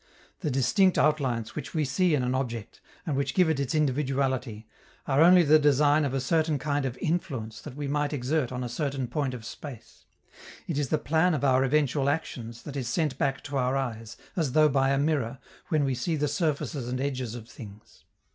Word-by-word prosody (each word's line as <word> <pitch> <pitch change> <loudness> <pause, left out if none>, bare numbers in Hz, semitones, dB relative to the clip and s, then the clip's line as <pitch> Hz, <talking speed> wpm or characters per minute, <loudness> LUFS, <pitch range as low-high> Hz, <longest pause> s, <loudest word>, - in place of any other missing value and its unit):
The 160 - -2
distinct 145 - +3
outlines 130 -7 +1
which - - -7
we 155 -2 +1
see 155 +5 +2
in 130 - 0
an 125 +1 0
object, 120 -5 -4 0.2
and 150 - -1
which 140 +1 -1
give 180 -4 +4
it 145 - -1
its 140 +1 -1
individuality, 130 -5 0 0.4
are 140 +1 +2
only 175 +1 +7
the 155 0 +6
design 145 +1 +4
of 135 -1 -2
a - - +1
certain 155 +2 +1
kind 145 0 -1
of 130 -1 -3
influence 130 -10 -3
that 140 -4 -9
we 145 -1 -4
might 145 +1 0
exert 140 -1 -1
on 125 0 -3
a - - -3
certain 135 +1 -2
point 130 +1 -2
of 115 -2 -9
space: 130 -1 -10 0.6
it 155 -4 -2
is 140 -4 -1
the 155 - +2
plan 160 +4 +2
of 145 - -3
our 130 -1 +4
eventual 140 0 +1
actions 120 -6 -4
that 145 - -8
is 130 -4 -3
sent 135 +1 -1
back 135 0 0
to 140 -1 -4
our 130 +1 +1
eyes, 115 -4 -4 0.2
as 155 -8 -1
though 155 -1 +5
by 135 -1 +2
a 135 - +2
mirror, 140 -4 0 0.3
when 155 -2 +1
we 135 -1 0
see 145 +7 -1
the 150 -1 0
surfaces 145 -3 -2
and 125 +1 -3
edges 130 -4 -3
of 115 -2 -9
things. 110 -1 -13
140 Hz, 210 wpm, -27 LUFS, 125-150 Hz, 0.6 s, only